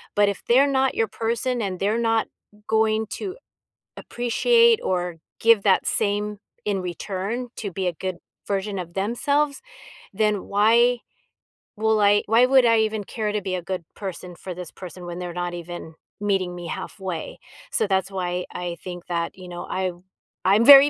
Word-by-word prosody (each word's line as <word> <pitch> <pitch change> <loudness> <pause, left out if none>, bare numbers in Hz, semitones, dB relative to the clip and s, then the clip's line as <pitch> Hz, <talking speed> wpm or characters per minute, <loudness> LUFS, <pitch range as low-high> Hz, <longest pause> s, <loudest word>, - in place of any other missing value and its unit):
but 205 0 +5
if 200 - -5
they're 260 +4 +6
not 265 -1 +2
your 225 - +2
person, 235 +3 -1
and 190 -3 -3
they're 210 +3 +1
not 225 -1 +2 0.4
going 220 0 +2
to 390 +3 -5 0.6
appreciate, 460 - +3
or 180 -2 -1 0.2
give 225 -3 +5
that 195 -2 +4
same 205 0 0 0.3
in 205 -2 0
return 195 +7 -3
to 205 -3 -4
be 190 +1 -2
a - - -1
good 185 +2 -4 0.3
version 200 0 -1
of 170 -1 -6
themselves, 280 +8 +1 0.5
then 210 -1 +1
why 235 +4 +4 0.8
will 220 0 +2
I 205 0 +5
why 230 +4 +6
would 260 -1 +5
I 230 -1 +5
even 220 -1 0
care 215 -1 -2
to 210 - 0
be 185 -1 -2
a 180 - -3
good 180 -1 -4
person 180 -2 -6
for 185 - -7
this 180 -1 -8
person, 180 -1 -9
when 175 0 -6
they're 180 -1 -4
not 175 0 -3
even 175 -1 -7 0.3
meeting 190 -3 0
me 175 -1 -7
halfway?" 185 -4 -5 0.3
So, - - +2
that's 190 0 +1
why 180 -1 -2
I 175 -1 -4
think 175 -1 -7
that, 170 +1 -2
you 185 -1 -10
know, 175 0 -6
I 185 -1 0 0.5
I'm 205 +5 +5
very 280 +1 +11
200 Hz, 170 wpm, -24 LUFS, 180-225 Hz, 0.8 s, very